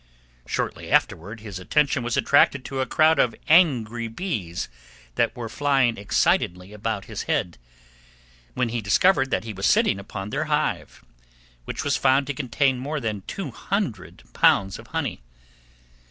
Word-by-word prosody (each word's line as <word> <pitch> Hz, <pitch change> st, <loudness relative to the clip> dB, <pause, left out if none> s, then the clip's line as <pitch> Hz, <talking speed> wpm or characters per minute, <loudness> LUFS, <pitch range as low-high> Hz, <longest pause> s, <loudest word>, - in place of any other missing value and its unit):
Shortly -, -, -3 dB
afterward 105 Hz, +7 st, 0 dB
his 105 Hz, -4 st, -7 dB
attention 140 Hz, +7 st, +1 dB
was 120 Hz, 0 st, -2 dB
attracted 140 Hz, -2 st, +3 dB
to 135 Hz, -, -4 dB
a 130 Hz, -, 0 dB
crowd 155 Hz, +5 st, +3 dB
of 120 Hz, -, +2 dB
angry 120 Hz, -9 st, +3 dB
bees 110 Hz, -, -4 dB, 0.5 s
that -, -, 0 dB
were 120 Hz, -2 st, -4 dB
flying 135 Hz, -1 st, +1 dB
excitedly 95 Hz, -1 st, 0 dB
about 105 Hz, -1 st, -3 dB
his -, -, -6 dB
head, 85 Hz, -8 st, -1 dB, 1.0 s
when 125 Hz, -, 0 dB
he 120 Hz, 0 st, -2 dB
discovered 135 Hz, -, +3 dB
that -, -, -1 dB
he 110 Hz, -1 st, -6 dB
was 95 Hz, 0 st, -1 dB
sitting 100 Hz, -, +3 dB
upon 100 Hz, +1 st, -7 dB
their -, -, -1 dB
hive, -, -, -2 dB, 0.6 s
which -, -, -4 dB
was -, -, +1 dB
found 135 Hz, +1 st, +3 dB
to 145 Hz, -, -3 dB
contain 130 Hz, 0 st, 0 dB
more 145 Hz, +4 st, -3 dB
than 110 Hz, -5 st, -3 dB
200 190 Hz, -, -4 dB
pounds 95 Hz, -1 st, +3 dB
of -, -, -13 dB
honey. -, -, -3 dB
120 Hz, 150 wpm, -24 LUFS, 105-140 Hz, 1.0 s, attracted